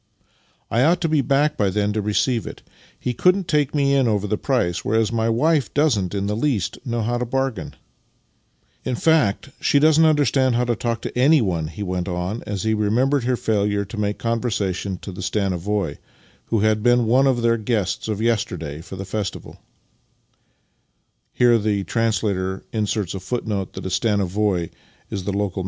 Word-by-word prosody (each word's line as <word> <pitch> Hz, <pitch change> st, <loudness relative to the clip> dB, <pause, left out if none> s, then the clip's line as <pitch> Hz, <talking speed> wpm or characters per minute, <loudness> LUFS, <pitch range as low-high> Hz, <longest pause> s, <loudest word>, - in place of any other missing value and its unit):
" -, -, -39 dB
I 115 Hz, -, +2 dB
ought 165 Hz, +6 st, +4 dB
to 165 Hz, -, +1 dB
be 155 Hz, -2 st, +2 dB
back 145 Hz, +3 st, +2 dB
by 105 Hz, -8 st, +1 dB
then 105 Hz, +2 st, 0 dB
to 110 Hz, -, -1 dB
receive 110 Hz, +3 st, 0 dB
it. -, -, -9 dB, 0.4 s
He 125 Hz, -, -2 dB
couldn't 180 Hz, +7 st, +2 dB
take 150 Hz, -4 st, +1 dB
me 140 Hz, -1 st, +2 dB
in 135 Hz, -3 st, +3 dB
over 105 Hz, -2 st, 0 dB
the 105 Hz, -, 0 dB
price, 105 Hz, -8 st, -1 dB
whereas 110 Hz, 0 st, +1 dB
my 115 Hz, -1 st, 0 dB
wife 140 Hz, +3 st, +2 dB
doesn't 110 Hz, -, +1 dB
in 100 Hz, 0 st, -1 dB
the 105 Hz, +1 st, -1 dB
least 115 Hz, -5 st, -1 dB
know 120 Hz, -2 st, -2 dB
how 120 Hz, +2 st, -1 dB
to 125 Hz, -, -1 dB
bargain. 135 Hz, -4 st, -2 dB, 1.1 s
In 125 Hz, -, -2 dB
fact, 145 Hz, -5 st, +2 dB
she -, -, +2 dB
doesn't 155 Hz, +2 st, +5 dB
understand 140 Hz, -5 st, +3 dB
how 120 Hz, -, +2 dB
to 120 Hz, -1 st, 0 dB
talk 115 Hz, +1 st, -3 dB
to -, -, -5 dB
anyone," 120 Hz, -, +3 dB
he 85 Hz, +6 st, -6 dB
v/ent 90 Hz, -2 st, -3 dB
on 90 Hz, +5 st, -3 dB
as 100 Hz, -2 st, -3 dB
he 110 Hz, 0 st, +1 dB
remembered 120 Hz, +6 st, +1 dB
her 125 Hz, 0 st, +1 dB
failure 105 Hz, -2 st, 0 dB
to 100 Hz, -, -9 dB
make 105 Hz, -1 st, -1 dB
con 115 Hz, -1 st, -1 dB
versation 100 Hz, -5 st, -2 dB
to 100 Hz, -, -7 dB
the 95 Hz, -, -8 dB
stanovoi,^ 95 Hz, -3 st, -1 dB, 0.5 s
who 110 Hz, -3 st, 0 dB
had 110 Hz, 0 st, +2 dB
been 120 Hz, +1 st, +3 dB
one 130 Hz, +5 st, +4 dB
of 120 Hz, -3 st, +1 dB
their 115 Hz, 0 st, +3 dB
guests 110 Hz, -3 st, -1 dB
of 105 Hz, -2 st, -2 dB
yesterday 90 Hz, -10 st, -1 dB
for 95 Hz, +3 st, -9 dB
the 95 Hz, +1 st, -6 dB
festival. 100 Hz, -1 st, -5 dB
115 Hz, 155 wpm, -22 LUFS, 100-130 Hz, 1.1 s, doesn't